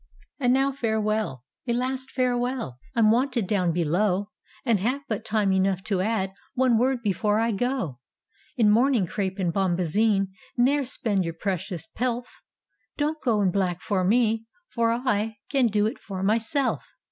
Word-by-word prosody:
"And 250 Hz, -3 st, +3 dB
now 270 Hz, +2 st, +3 dB
farewell! 220 Hz, -, -1 dB, 0.2 s
a 235 Hz, -, +1 dB
last 260 Hz, +2 st, -2 dB
farewell! 245 Hz, -, -1 dB, 0.2 s
I'm 220 Hz, -2 st, +5 dB
wanted 245 Hz, -2 st, +1 dB
down 185 Hz, -3 st, +1 dB
below, 180 Hz, +5 st, 0 dB, 0.3 s
And 230 Hz, -5 st, +3 dB
have 255 Hz, +8 st, -1 dB
but 215 Hz, -, -3 dB
time 210 Hz, -3 st, +1 dB
enough 190 Hz, 0 st, +1 dB
to 195 Hz, -3 st, 0 dB
add 195 Hz, -2 st, -1 dB, 0.2 s
One 250 Hz, -3 st, +3 dB
word 255 Hz, -1 st, +1 dB
before 210 Hz, +1 st, +1 dB
I 230 Hz, +1 st, +1 dB
go 235 Hz, -, -2 dB, 0.3 s
— -, -, -35 dB
In 215 Hz, -3 st, +5 dB
mourning 240 Hz, -2 st, +3 dB
crepe 190 Hz, +2 st, -3 dB
and 180 Hz, -4 st, 0 dB
bombazine 195 Hz, +2 st, +1 dB, 0.3 s
Ne'er 275 Hz, +3 st, +3 dB
spend 215 Hz, -6 st, 0 dB
your 165 Hz, -1 st, -4 dB
precious 180 Hz, -2 st, -3 dB
pelf; 245 Hz, +2 st, -4 dB, 0.6 s
Don't 305 Hz, +1 st, -1 dB
go 225 Hz, -5 st, +2 dB
in 185 Hz, -, +3 dB
black 180 Hz, -2 st, 0 dB
for 185 Hz, +3 st, -1 dB
me 225 Hz, +2 st, +2 dB
— 360 Hz, -, -41 dB
for 230 Hz, -2 st, +2 dB
I 220 Hz, -3 st, 0 dB
Can 270 Hz, -4 st, +4 dB
do 210 Hz, -1 st, +1 dB
it 225 Hz, +7 st, -2 dB
for 190 Hz, -2 st, -6 dB
myself. 230 Hz, +6 st, 0 dB
220 Hz, 165 wpm, -25 LUFS, 190-245 Hz, 0.6 s, I'm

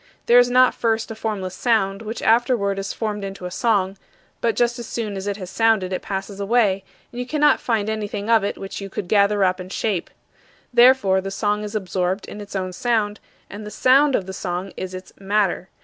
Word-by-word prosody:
There 240 Hz, +1 st, +7 dB
is 245 Hz, 0 st, +4 dB
not 255 Hz, 0 st, +5 dB
first 225 Hz, -1 st, -1 dB
a -, -, -5 dB
formless 210 Hz, -4 st, -3 dB
sound, 195 Hz, -2 st, +1 dB
which 225 Hz, +1 st, -6 dB
afterward 225 Hz, -4 st, +2 dB
is 195 Hz, -, -3 dB
formed 210 Hz, -2 st, -3 dB
into 195 Hz, -2 st, -6 dB
a 180 Hz, -, -5 dB
song; 195 Hz, -2 st, 0 dB, 0.4 s
but 230 Hz, -1 st, +1 dB
just 240 Hz, 0 st, +1 dB
as 235 Hz, -, -7 dB
soon 215 Hz, -4 st, -4 dB
as 195 Hz, +1 st, -5 dB
it 200 Hz, 0 st, -2 dB
has 185 Hz, -2 st, -8 dB
sounded 220 Hz, -5 st, +2 dB
it 185 Hz, -, -2 dB
passes 195 Hz, 0 st, -5 dB
away, 200 Hz, -2 st, +2 dB, 0.3 s
and 240 Hz, -, -7 dB
you 250 Hz, -, -5 dB
cannot 295 Hz, +1 st, +3 dB
find 220 Hz, -4 st, -1 dB
anything 210 Hz, -1 st, -3 dB
of 225 Hz, -2 st, +4 dB
it 200 Hz, -, -2 dB
which 195 Hz, +1 st, -7 dB
you 195 Hz, -, -6 dB
could 190 Hz, -, -5 dB
gather 200 Hz, 0 st, +3 dB
up 185 Hz, 0 st, +1 dB
and 185 Hz, +1 st, -8 dB
shape. 200 Hz, -5 st, -2 dB, 0.6 s
Therefore, 240 Hz, -6 st, +5 dB
the 195 Hz, -, -5 dB
song 210 Hz, +1 st, -1 dB
is 210 Hz, +1 st, -6 dB
absorbed 185 Hz, -1 st, -2 dB
in 210 Hz, -, -8 dB
its 205 Hz, 0 st, -9 dB
own 185 Hz, -1 st, -2 dB
sound 215 Hz, 0 st, 0 dB, 0.3 s
and 205 Hz, +2 st, -9 dB
the 210 Hz, -, -7 dB
"sound" 270 Hz, +5 st, +4 dB
of 190 Hz, -, -1 dB
the 190 Hz, -, -7 dB
song 180 Hz, +1 st, -4 dB
is 185 Hz, 0 st, -5 dB
its 185 Hz, 0 st, -10 dB
"matter." 195 Hz, -2 st, 0 dB
205 Hz, 215 wpm, -22 LUFS, 195-225 Hz, 0.6 s, There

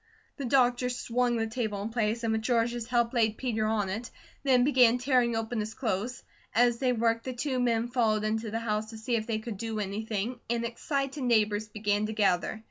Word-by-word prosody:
The 280 Hz, -, -4 dB
doctor 250 Hz, -1 st, +3 dB
swung 245 Hz, 0 st, 0 dB
the 225 Hz, -, 0 dB
table 220 Hz, -3 st, -3 dB
in 215 Hz, -, -3 dB
place, 225 Hz, 0 st, -1 dB
and 225 Hz, -, +1 dB
with 220 Hz, -, 0 dB
George's 235 Hz, 0 st, 0 dB
help 235 Hz, -1 st, +1 dB
laid 220 Hz, -3 st, +2 dB
Peter 225 Hz, -4 st, -1 dB
on 215 Hz, -2 st, 0 dB
it, 220 Hz, +6 st, -4 dB, 0.3 s
then 255 Hz, -3 st, +4 dB
began 250 Hz, -3 st, +5 dB
tearing 250 Hz, -2 st, +2 dB
open 225 Hz, +1 st, -2 dB
his 215 Hz, +1 st, -4 dB
clothes. 235 Hz, +1 st, -2 dB, 0.3 s
As 240 Hz, 0 st, +4 dB
they 255 Hz, -2 st, +2 dB
worked 230 Hz, -1 st, +1 dB
the 260 Hz, -, -3 dB
two 255 Hz, +1 st, -2 dB
men 235 Hz, -1 st, +1 dB
followed 225 Hz, -4 st, +1 dB
into 220 Hz, +1 st, -1 dB
the 220 Hz, -, -2 dB
house 215 Hz, -1 st, -2 dB
to 225 Hz, -, -9 dB
see 230 Hz, +2 st, -1 dB
if 220 Hz, -1 st, -2 dB
they 225 Hz, -2 st, 0 dB
could 220 Hz, -1 st, -6 dB
do 225 Hz, +1 st, -3 dB
anything 215 Hz, +3 st, -3 dB
and 235 Hz, 0 st, 0 dB
excited 275 Hz, +4 st, -3 dB
neighbours 215 Hz, -3 st, +2 dB
began 210 Hz, 0 st, 0 dB
to 220 Hz, -, -4 dB
gather. 205 Hz, 0 st, +1 dB
230 Hz, 210 wpm, -29 LUFS, 215-245 Hz, 0.3 s, began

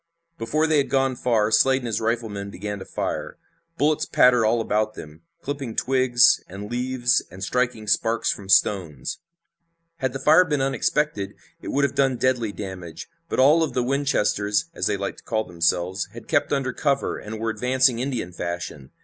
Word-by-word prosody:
Before 155 Hz, +8 st, 0 dB
they 160 Hz, -1 st, +2 dB
had 140 Hz, -, 0 dB
gone 135 Hz, -1 st, +1 dB
far 115 Hz, -3 st, +1 dB
Slade 130 Hz, +4 st, +4 dB
and -, -, -5 dB
his 115 Hz, -2 st, -2 dB
riflemen 110 Hz, -3 st, -2 dB
began 105 Hz, +1 st, -5 dB
to -, -, -8 dB
fire. -, -, -4 dB, 0.4 s
Bullets 150 Hz, +1 st, +1 dB
pattered 125 Hz, -3 st, +4 dB
all 115 Hz, +2 st, +2 dB
about 110 Hz, -1 st, 0 dB
them, 75 Hz, +1 st, -11 dB, 0.2 s
clipping 140 Hz, -5 st, -4 dB
twigs 130 Hz, -2 st, +3 dB
and 100 Hz, +3 st, -8 dB
leaves 125 Hz, 0 st, +1 dB
and 95 Hz, +3 st, -9 dB
striking 125 Hz, 0 st, -1 dB
sparks 115 Hz, +2 st, +1 dB
from 95 Hz, -2 st, -8 dB
stones. 85 Hz, -10 st, +1 dB, 0.8 s
Had 130 Hz, -5 st, -2 dB
the -, -, -3 dB
fire 160 Hz, +6 st, +6 dB
been 150 Hz, -5 st, -1 dB
unexpected 135 Hz, -5 st, -1 dB, 0.3 s
it -, -, -9 dB
would 140 Hz, -, 0 dB
have 140 Hz, -, +1 dB
done 135 Hz, -2 st, +1 dB
deadly 120 Hz, -4 st, 0 dB
damage, 95 Hz, -5 st, -8 dB, 0.2 s
but -, -, -2 dB
all 150 Hz, +5 st, +6 dB
of 160 Hz, -, -1 dB
the 125 Hz, -, 0 dB
Winchesters, 120 Hz, -3 st, 0 dB
as -, -, -2 dB
they -, -, 0 dB
liked 100 Hz, 0 st, -4 dB
to -, -, -20 dB
call 110 Hz, -1 st, -1 dB
themselves, 90 Hz, +1 st, -1 dB
had -, -, -11 dB
kept -, -, +1 dB
under 135 Hz, -3 st, 0 dB
cover, 140 Hz, 0 st, -1 dB
and 110 Hz, +1 st, -7 dB
were 115 Hz, 0 st, -1 dB
advancing 125 Hz, +2 st, +2 dB
Indian 125 Hz, -9 st, -3 dB
fashion. 85 Hz, -6 st, -5 dB
120 Hz, 180 wpm, -23 LUFS, 100-135 Hz, 0.8 s, fire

